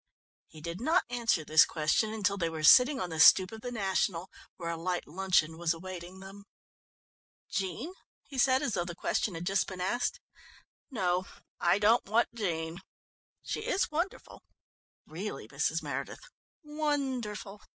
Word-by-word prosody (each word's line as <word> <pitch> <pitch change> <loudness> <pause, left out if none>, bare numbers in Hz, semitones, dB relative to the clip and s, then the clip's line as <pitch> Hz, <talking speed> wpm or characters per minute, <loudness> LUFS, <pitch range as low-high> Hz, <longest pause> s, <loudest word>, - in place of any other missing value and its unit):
He 155 - -14
did 170 +5 -6
not 325 +8 +3
answer 230 -10 +1
this 155 +1 +7
question 160 +7 0
until 205 -2 0
they 170 -4 -1
were 160 -1 -6
sitting 255 - +7
on 180 -2 -3
the 160 - -4
stoep 185 +3 +7
of 220 0 -9
the 245 - -5
National, 190 -4 -1 0.3
where 170 -2 -4
a - - -3
light 175 +2 -2
luncheon 170 -2 +1
was 170 -1 +1
awaiting 180 +1 -8
them. 195 +1 -11 1.1
"Jean?" 195 - -3 0.3
he 270 -3 -7
said, 260 +2 +4
as 235 - -1
though 175 - 0
the 175 -1 -7
question 185 +1 -1
had 165 +1 -5
just 195 +1 +1
been 185 -1 -7
asked. 245 - -1 0.7
"No, 185 - -1 0.3
I 175 +2 +3
don't 215 +3 +3
want 225 +4 +2
Jean. 170 -6 -3 0.6
She - - -3
is 440 -6 -1
wonderful, 335 +5 -4 0.6
really, - - -6
Mrs. - - -1
Meredith, - - -5 0.4
wonderful! 265 -9 -3
195 Hz, 155 wpm, -30 LUFS, 175-245 Hz, 1.1 s, this